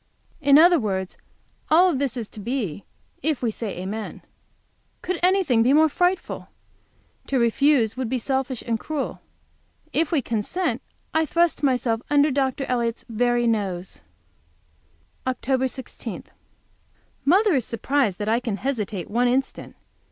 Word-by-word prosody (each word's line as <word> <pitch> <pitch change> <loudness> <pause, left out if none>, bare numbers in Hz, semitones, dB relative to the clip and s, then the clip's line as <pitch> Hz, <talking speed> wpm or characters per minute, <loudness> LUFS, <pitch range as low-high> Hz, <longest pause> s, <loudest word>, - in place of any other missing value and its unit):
In 280 0 +6
other 345 +1 +7
words, 190 -5 -2 0.5
all 350 +3 +5
this 270 -2 -1
is 230 -3 -4
to - - -10
be 210 - -3 0.4
if 300 -2 -1
we 230 - +1
say 215 -3 -5
amen. 205 +4 -5 0.8
Could 365 -1 -2
anything 360 -10 +3
be 250 +4 +4
more 315 +1 +5
frightful? 360 +4 -1 0.8
To 275 - 0
refuse 235 0 +3
would 255 -3 -3
be 260 - 0
selfish 265 0 -2
and 230 -2 -1
cruel. 300 +1 -4 0.7
If 325 -1 +1
we 300 -6 +1
consent 230 - -1 0.3
I 320 0 +2
thrust 340 +2 +1
myself 250 -5 +1
under 290 0 +4
Dr. 270 0 0
Elliott's 235 -2 -1
very 240 +1 +1
nose. 195 -5 -2 1.3
OCT. 260 +1 0
16. 260 0 -7 1.0
Mother 385 +7 +4
is 260 -6 +1
surprised 230 -4 0
that 210 - -4
I 225 +2 +2
can 230 -5 -3
hesitate 215 -8 -3
one 240 +3 +1
instant. 265 +2 -2
255 Hz, 135 wpm, -24 LUFS, 225-290 Hz, 1.3 s, other